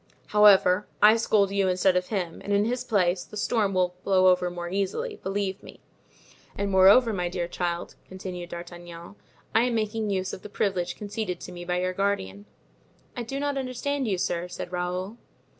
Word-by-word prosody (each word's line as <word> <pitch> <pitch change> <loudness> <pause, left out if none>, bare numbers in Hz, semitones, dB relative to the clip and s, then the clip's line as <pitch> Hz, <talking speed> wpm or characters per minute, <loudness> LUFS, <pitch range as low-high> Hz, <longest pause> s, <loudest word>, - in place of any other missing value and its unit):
However, 205 -2 +5
I 215 +1 +7
scold 210 -3 +2
you 200 -1 +1
instead 185 0 +2
of 180 0 0
him, 180 -6 -3
and 205 - -4
in 200 +1 +3
his 245 +2 -1
place; 185 -6 +1
the 210 - -11
storm 205 -2 0
will 180 -1 +1
blow 185 -1 +4
over 180 -1 +2
more 175 0 -6
easily, 200 - -2
believe 195 0 -3
me. - - -13 0.8
And 200 0 -2
moreover, 200 +5 +6
my 180 -3 -1
dear 175 -1 -3
child," 175 0 -3
continued 180 -2 -7
D'Artagnan, 175 0 -9 0.4
"I 225 +2 +4
am 245 -2 0
making 215 0 -1
use 190 -1 -2
of - - -7
the 210 - -9
privilege 185 -4 -1
conceded 205 -3 -4
to - - -8
me 175 -1 -8
by 180 0 -1
your 185 0 -1
guardian." 105 - -2 0.7
"I 245 - -3
do 270 +4 -4
not 285 -1 -1
understand 265 +1 -2
you, 195 -3 0
sir," 175 0 -2
said 180 0 -7
Raoul. 180 +4 -3
190 Hz, 185 wpm, -26 LUFS, 180-210 Hz, 0.8 s, I